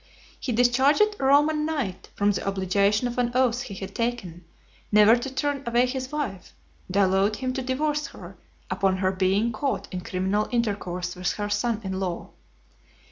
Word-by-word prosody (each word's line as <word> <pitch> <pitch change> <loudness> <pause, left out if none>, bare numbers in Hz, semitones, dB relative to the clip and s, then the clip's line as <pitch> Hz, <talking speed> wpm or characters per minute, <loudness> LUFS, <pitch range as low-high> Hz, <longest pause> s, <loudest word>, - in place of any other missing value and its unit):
He 255 - -3
discharged 265 - +3
a - - -4
Roman 295 +3 +4
knight 280 - -3
from 205 0 +2
the 200 - -3
obligation 200 +4 +1
of 245 +1 -4
an 245 -1 +1
oath 250 -2 +2
he 200 - -7
had 190 +1 -7
taken, 195 -8 -3 0.5
never 210 +2 +7
to 255 +2 -4
turn 285 +1 -1
away 240 +1 +3
his 260 +1 -4
wife; 250 -12 -5 0.3
and 185 - -7
allowed 195 +1 +3
him 255 +3 -3
to 265 - -2
divorce 295 +4 -1
her, - - -11 0.4
upon 190 -1 +1
her 185 0 +1
being 190 +4 +1
caught 270 +5 -2
in 180 - -3
criminal 190 +4 -1
intercourse 190 -6 -2
with 180 0 -1
her 205 -1 -4
son 220 +1 0
in 190 -1 -3
law. 180 -3 -4
220 Hz, 175 wpm, -25 LUFS, 190-260 Hz, 0.5 s, never